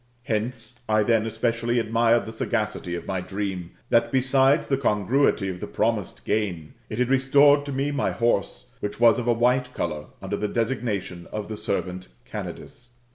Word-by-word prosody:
Hence, 115 +1 -3
I 110 0 +4
then 115 0 +2
especially 115 +2 0
admired 115 +1 +2
the 110 - -6
sagacity 90 -5 -2
of 85 - -6
my 95 -2 -2
dream, 95 -2 -4 0.2
that, 115 0 +3
besides 135 +3 +3
the 135 - +1
congruity 115 -2 +2
of 90 -1 -4
the - - -5
promised - - -1
gain, 90 -8 -1 0.2
it 110 - -5
had 125 +1 +1
restored 140 +2 +5
to - - -3
me 140 +2 -1
my 145 - 0
horse, 115 -4 -1
which 105 +1 -4
was 120 -1 +6
of 120 - -4
a - - +5
white 125 +2 +1
colour, 75 -3 -3
under - - -3
the 105 - -1
designation 110 -7 -2
of 105 0 -5
the 110 - -4
servant 90 -3 -3 0.2
Candidus. 120 0 -8
115 Hz, 175 wpm, -25 LUFS, 100-125 Hz, 0.2 s, was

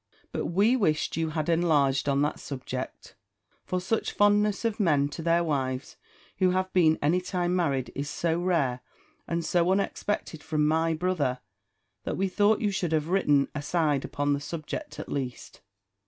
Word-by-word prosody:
But - - -2
we 205 +8 +3
wished 160 -11 +1
you 165 -1 -1
had 155 -1 -2
enlarged 150 -5 +2
on 140 +1 +2
that 150 - -1
subject: 130 -1 -6 0.5
for 185 - -2
such 190 +5 -1
fondness 205 +1 +3
of 225 -1 -1
men 145 -7 +3
to 145 - -7
their 170 +1 +2
wives, 135 -4 -2 0.4
who 185 - +4
have 185 +1 -1
been 160 -4 +4
any 170 +5 +3
time 180 -1 -1
married, 140 -8 0
is 145 +1 -4
so 165 +1 -1
rare, 160 -9 +1 0.5
and 170 -1 -2
so 175 +2 +2
unexpected 195 -4 -1
from 150 -1 0
my 160 +1 +2
brother, 155 -7 0 0.6
that - - -3
we 195 - +1
thought 205 +3 +2
you 210 -2 +1
should 175 -4 -1
have 155 0 0
written 145 -7 +3
a 150 - -3
side 150 -2 +1
upon 145 0 -1
that 140 - -1
subject 165 - -6
at - - -6
least. 130 -3 -5
165 Hz, 170 wpm, -27 LUFS, 145-185 Hz, 0.6 s, who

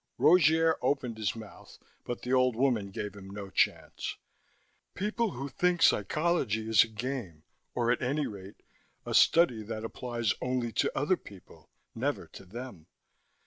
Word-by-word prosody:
Rogier 160 -1 +5
opened 125 -5 -1
his 105 -1 -1
mouth, 110 -2 -12 0.3
but 120 - -5
the 125 - -1
old 130 -2 +3
woman 120 -5 +1
gave 100 +1 -5
him 100 -1 -11
no 100 -1 -7
chance. - - 0 0.8
"People 210 +1 -1
who 135 +3 -5
think 175 +6 +1
psychology 110 - +2
is 110 -2 +6
a - - -6
game, 110 - -5 0.3
or 120 -1 +2
at 125 - 0
any 140 +4 0
rate 100 -1 -9 0.4
a - - -4
study 145 -10 +5
that 110 +1 -5
applies 120 -2 -2
only 125 -2 -1
to - - +1
other 150 +7 +2
people, 100 -3 -15 0.2
never - - -2
to - - -12
them. 110 -4 -9
120 Hz, 150 wpm, -30 LUFS, 105-140 Hz, 0.8 s, is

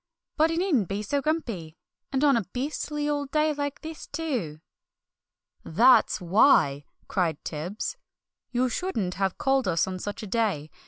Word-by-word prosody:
But 315 +1 +3
he 330 - -1
needn't 320 - +2
be 200 +2 -3
so 280 +7 0
grumpy, 230 - -3 0.3
and 270 +1 0
on 280 -2 +5
a 230 -4 0
beastly 295 +3 -2
old 290 -2 -1
day 305 +1 +2
like 285 -1 -4
this, 320 -1 -8
too!" 255 - -3 1.0
"That's 245 +10 +4
why!" 170 - +4 0.2
cried 170 -6 -1
Tibbs. 175 - -4 0.5
"You 250 +1 +1
shouldn't 230 - -2
have 195 -1 -1
called 270 -3 +1
us 165 -3 +2
on 185 -1 -5
such 205 +3 -5
a - - -4
day! 195 -9 -1
240 Hz, 155 wpm, -26 LUFS, 185-290 Hz, 1.0 s, on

